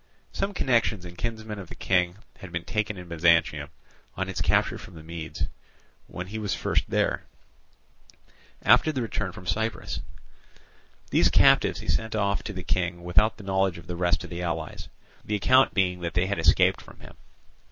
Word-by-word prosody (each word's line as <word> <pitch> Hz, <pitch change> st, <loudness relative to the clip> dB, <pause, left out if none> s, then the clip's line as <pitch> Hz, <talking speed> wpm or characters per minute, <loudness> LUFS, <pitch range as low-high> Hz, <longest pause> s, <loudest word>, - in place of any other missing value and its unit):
Some 200 Hz, 0 st, -2 dB
connections 115 Hz, -, +1 dB
and 90 Hz, 0 st, -9 dB
kinsmen 110 Hz, 0 st, -4 dB
of 95 Hz, -, -9 dB
the -, -, -9 dB
King 90 Hz, -2 st, +1 dB, 0.2 s
had 95 Hz, -, -10 dB
been 85 Hz, 0 st, -3 dB
taken 105 Hz, 0 st, -1 dB
in 90 Hz, -1 st, -9 dB
Byzantium, 80 Hz, -3 st, +2 dB, 0.5 s
on 95 Hz, 0 st, -2 dB
its 95 Hz, -, -3 dB
capture -, -, +2 dB
from 90 Hz, -, -12 dB
the 80 Hz, -, -10 dB
Medes, 80 Hz, 0 st, -6 dB, 0.6 s
when 90 Hz, -, -6 dB
he 105 Hz, +4 st, -6 dB
was 105 Hz, -2 st, -1 dB
first -, -, 0 dB
there, -, -, 0 dB, 1.4 s
after 155 Hz, -, +5 dB
the 130 Hz, -5 st, -2 dB
return 105 Hz, -4 st, -3 dB
from 90 Hz, -, -11 dB
Cyprus. 110 Hz, +3 st, -2 dB, 1.1 s
These -, -, +4 dB
captives -, -, +4 dB
he -, -, -10 dB
sent 110 Hz, -1 st, 0 dB
off 100 Hz, -1 st, +1 dB
to -, -, -3 dB
the 90 Hz, -1 st, -6 dB
King 90 Hz, -1 st, -1 dB
without 105 Hz, +5 st, +3 dB
the 105 Hz, -, -11 dB
knowledge 95 Hz, -2 st, +1 dB
of 85 Hz, -, -11 dB
the 90 Hz, -, -5 dB
rest 85 Hz, -2 st, +1 dB
of -, -, -9 dB
the 85 Hz, 0 st, -4 dB
allies, 80 Hz, -3 st, -4 dB, 0.3 s
the 105 Hz, -, -2 dB
account 130 Hz, +6 st, +4 dB
being 90 Hz, -2 st, +2 dB
that 85 Hz, -2 st, -4 dB
they 90 Hz, +2 st, +3 dB
had 100 Hz, -2 st, -2 dB
escaped 80 Hz, -1 st, +4 dB
from -, -, -15 dB
him. -, -, -13 dB
90 Hz, 185 wpm, -26 LUFS, 85-105 Hz, 1.4 s, after